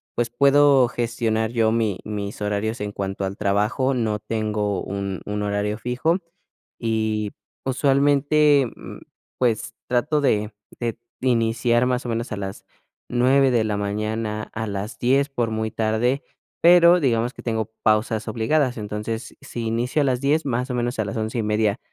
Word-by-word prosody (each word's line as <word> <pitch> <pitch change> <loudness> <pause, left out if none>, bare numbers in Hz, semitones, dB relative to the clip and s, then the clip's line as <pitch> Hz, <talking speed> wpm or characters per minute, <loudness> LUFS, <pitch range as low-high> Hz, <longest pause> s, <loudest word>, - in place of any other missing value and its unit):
pues 120 -1 0
puedo 140 0 +5
gestionar 115 -2 -1
yo 115 -2 +2
mi 110 -5 0
mis 105 -1 -5
horarios 105 +3 -1
en 105 0 -3
cuanto 95 0 -3
al 95 +1 -4
trabajo, 105 +7 +1
no 110 -4 -1
tengo 105 -2 -2
un 100 -1 -4
un 105 0 -3
horario 105 +1 -1
fijo 125 +9 0 0.6
y 110 -2 -1 0.3
usualmente, 140 +1 +3
mm, - - -10 0.4
pues 120 -1 0
trato 145 +5 +1
de 105 -6 +1 0.3
de 115 -2 -2 0.2
iniciar 120 0 +2
más 125 0 -1
o - - -3
menos 115 +1 -2
a - - -4
las 95 0 -6 0.4
9 130 +2 +3
de 115 -2 +3
la 105 -1 -1
mañana, 105 +1 -3
a 110 0 -3
las 100 +2 -5
10 135 +3 +2
por 120 -4 -1
muy 110 0 -1
tarde, 115 +5 0 0.4
pero 175 +1 +7
digamos 120 -3 +1
que - - -11
tengo 110 -1 -2
pausas 110 +1 +1
obligadas. 125 +2 +1
Entonces, 105 +2 -5
si 120 - -6
inicio 120 +6 0
a - - +2
las 130 -1 0
10, 150 +3 +2
más 125 0 -1
o - - -2
menos 120 0 -1
a 110 - +1
las 105 - -4
11:30 110 0 0
115 Hz, 160 wpm, -23 LUFS, 105-125 Hz, 0.6 s, pero